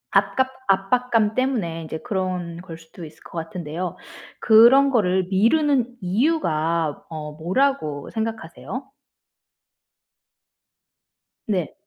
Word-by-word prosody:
아깝 260 0 +2 0.2
압박감 215 +3 +2
때문에 215 -11 -1
이제 160 0 -5
그런 180 -4 -3
걸 165 -3 -9
수도 165 +1 -13
있을 155 0 -12
것 - - -14
같은데요. 165 +1 -5 0.4
그런 245 +5 +6
거를 190 -5 +2
미루는 250 +4 +2
이유가 170 - 0
어 155 -2 -6
뭐라고 165 - -1
생각하세요? 220 - -5 2.6
네. 185 -7 -2
190 Hz, 210 characters per minute, -22 LUFS, 165-245 Hz, 2.6 s, 그런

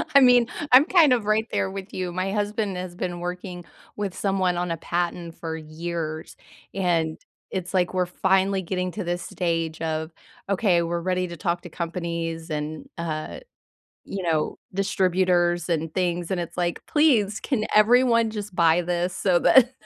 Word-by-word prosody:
I - - +11
mean, 245 -3 +6 0.2
I'm 265 +4 +8
kind 330 -8 +5
of 235 -4 0
right 215 +2 +1
there 190 - 0
with 195 +1 -8
you. 180 -1 -3
My 185 +2 -2
husband 205 -1 -1
has 180 -1 -6
been 175 -1 -4
working 180 0 -6 0.3
with 200 -3 -3
someone 190 -3 0
on 175 -1 -1
a 165 - -2
patent 170 0 -3
for 160 -1 -5
years, 160 0 -5 0.4
and 170 -4 0 0.3
it's 185 0 -4
like 180 -1 +1
we're 185 -1 +1
finally 190 +2 +1
getting 180 0 -2
to 205 +2 -4
this 175 0 -2
stage 165 -2 -2
of, 160 0 -2 0.4
okay, 185 -4 +2
we're 170 +1 -2
ready 185 +1 0
to 170 -1 -8
talk 175 -1 -1
to 175 - -10
companies 170 -1 -4
and, 150 +1 -4
uh, 155 -2 -4 0.7
you 195 -1 -5
know, 160 -3 0
distributors 180 -3 +1
and 165 -2 -1
things, 175 -2 -1
and 185 -2 0
it's 170 - -6
like, 175 -1 -2
"Please, 230 -10 +3
can 245 -7 -1
everyone 230 +1 +5
just 210 -3 -6
buy 170 0 +4
this 175 +1 -1
so 185 -2 +3
that" 260 -1 +6
180 Hz, 170 wpm, -24 LUFS, 170-195 Hz, 0.7 s, I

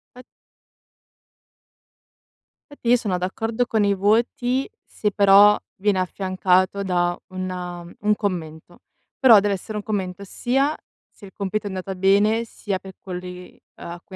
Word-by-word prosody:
Fat 250 - -12 2.5
Infatti 240 -5 -5
io 245 - +7
sono 205 -6 -1
d'accordo 225 +6 -2
con 220 -2 +1
i 200 0 +3
voti, 240 +6 +1 0.2
se 210 -1 -2
però 200 +1 +6 0.2
viene 200 -1 +1
affiancato 185 +1 +1
da 175 -2 0
un, 185 0 -4
uhm, 175 -1 -7
un 210 0 +2
commento. 175 -5 -5 0.4
Però 235 -6 +8
dev'essere 205 +1 -2
un 205 - -5
commento 195 -2 -3
sia 270 +9 0 0.3
se 205 - -16
il 190 - -13
compito 205 +1 -3
è - - -3
andata 190 0 -5
bene, 205 +5 +3
sia 200 -4 -4
per 190 0 -11
quelli 180 -1 -8 0.2
a 170 0 -8
cui 190 - -12
195 Hz, 140 wpm, -22 LUFS, 185-215 Hz, 2.5 s, Però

